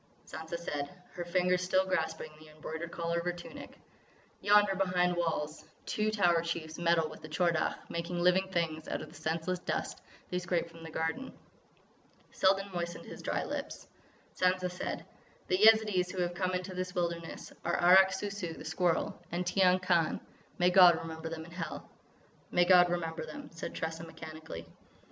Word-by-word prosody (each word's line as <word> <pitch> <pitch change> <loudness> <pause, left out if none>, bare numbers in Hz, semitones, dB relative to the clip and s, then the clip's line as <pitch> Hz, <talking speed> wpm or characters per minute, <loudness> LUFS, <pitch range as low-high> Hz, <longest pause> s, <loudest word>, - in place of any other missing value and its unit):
Sansa 160 +2 -6
said, 145 -4 -4 0.2
her 175 - -5
fingers 180 +1 +2
still 185 +1 +2
grasping 160 -4 -2
the 155 0 -14
embroidered 160 +2 -6
collar 170 0 -1
of - - -4
her 175 - +1
tunic: 175 0 -10 0.6
"Yonder, 205 -1 +5
behind 180 -2 +2
walls, 160 -3 -2 0.2
two 215 0 0
Tower 175 -6 +3
Chiefs 165 -1 -4
meddle 170 -2 +3
with 155 - -11
the 155 - -8
Tchor 170 +2 +2
Dagh, 155 - 0
making 170 +1 -3
living 180 +2 +4
things 165 -4 -1
out - - -3
of - - -10
the - - -16
senseless 165 +3 -1
dust - - -3 0.3
they 180 - 0
scrape 175 -1 -1
from 165 0 -13
the 165 - -8
garden." 160 +12 -3 0.9
Selden 195 +1 +2
moistened 170 -1 -4
his - - -9
dry - - -1
lips. - - -5 0.5
Sansa 185 0 +1
said: 180 - -4 0.4
"The 185 - +2
Yezidees 215 -4 +5
who 185 -1 -1
have 175 0 -2
come 185 +1 -1
into 180 +1 -4
this 185 +1 -4
wilderness 170 -1 -3
are 175 - 0
Arrak 190 +2 +7
Sou 200 +1 -3
Sou, 185 -5 -4
the - - -10
Squirrel; 175 -3 0
and 175 +1 -1
Tiyang 185 0 +4
Khan.... 170 -3 +2 0.4
May 180 0 +4
God 180 -2 +8
remember 160 0 -6
them 160 -1 -6
in 170 - -13
Hell!" 170 -1 -6 0.6
"May 175 0 +3
God 180 -1 +7
remember 165 -2 -2
them," 155 -1 -9
said 165 - -6
Tressa 160 0 -3
mechanically. 155 - -8
175 Hz, 175 wpm, -32 LUFS, 165-185 Hz, 0.9 s, God